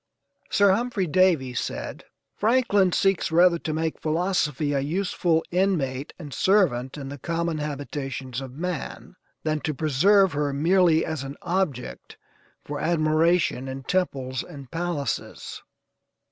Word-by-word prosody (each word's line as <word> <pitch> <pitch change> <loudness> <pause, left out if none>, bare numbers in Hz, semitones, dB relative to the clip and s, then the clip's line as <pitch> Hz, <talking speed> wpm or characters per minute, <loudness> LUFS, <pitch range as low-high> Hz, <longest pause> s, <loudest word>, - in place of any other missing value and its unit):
Sir 200 -1 +4
Humphrey 225 -1 0
Davy 165 -6 +2
said: - - -4 0.3
"Franklin 210 -4 +3
seeks 195 -1 +1
rather 170 +1 +5
to 160 - -3
make 160 +1 -2
philosophy 155 -3 0
a 140 - +1
useful 165 +2 0
inmate 160 -8 0
and 150 -6 -9
servant 155 -11 +2
in 135 -2 -6
the 140 0 -8
common 170 +1 -2
habitations 135 -3 -4
of 130 -2 -8
man, 180 -2 -5 0.3
than 155 -1 0
to 150 0 -3
preserve 180 +6 +4
her 145 -1 -1
merely 165 +2 +3
as 160 -3 -3
an 135 +1 -7
object 160 - -3 0.5
for 145 0 -5
admiration 155 -3 +2
in 135 0 -6
temples 130 -7 -1
and 140 -3 -11
palaces." 165 -6 -4
160 Hz, 130 wpm, -25 LUFS, 140-180 Hz, 0.5 s, rather